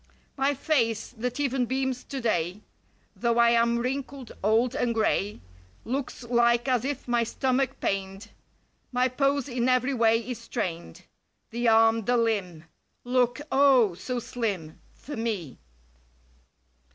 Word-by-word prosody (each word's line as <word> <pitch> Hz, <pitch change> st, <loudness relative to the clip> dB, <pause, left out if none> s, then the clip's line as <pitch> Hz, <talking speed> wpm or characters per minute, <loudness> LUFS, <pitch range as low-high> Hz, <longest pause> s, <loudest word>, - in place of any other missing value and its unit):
My 275 Hz, +1 st, +1 dB
face, 235 Hz, -7 st, 0 dB
that 250 Hz, +3 st, -4 dB
even 265 Hz, -3 st, 0 dB
beams 260 Hz, 0 st, -2 dB
today. 210 Hz, -8 st, -2 dB, 0.5 s
Though 235 Hz, -1 st, 0 dB
I 235 Hz, 0 st, +5 dB
am 235 Hz, 0 st, +3 dB
wrinkled, 260 Hz, +1 st, -4 dB
old 225 Hz, +4 st, +3 dB
and 245 Hz, -4 st, 0 dB
gray, 210 Hz, -2 st, 0 dB, 0.4 s
Looks 255 Hz, +1 st, -4 dB
like 235 Hz, +1 st, +2 dB
as 250 Hz, -3 st, +2 dB
if 275 Hz, -1 st, -4 dB
my 240 Hz, -1 st, +2 dB
stomach 260 Hz, +2 st, -1 dB
pained. 195 Hz, +2 st, -3 dB, 0.6 s
My 250 Hz, 0 st, +2 dB
pose 275 Hz, +1 st, 0 dB
in 250 Hz, -1 st, 0 dB
every 255 Hz, +2 st, +2 dB
way 225 Hz, -2 st, +4 dB
is 235 Hz, +1 st, -5 dB
strained. 180 Hz, -, -5 dB, 0.5 s
The 240 Hz, +1 st, -1 dB
arm, 225 Hz, -1 st, +4 dB
the 245 Hz, +1 st, +2 dB
limb. 200 Hz, -8 st, -1 dB, 0.4 s
Look 245 Hz, +2 st, +1 dB
O, 265 Hz, -7 st, +5 dB
so 245 Hz, +8 st, -4 dB
slim— 205 Hz, -10 st, -4 dB
For 290 Hz, -, -8 dB
me. 215 Hz, -, -4 dB
235 Hz, 130 wpm, -27 LUFS, 225-255 Hz, 0.6 s, I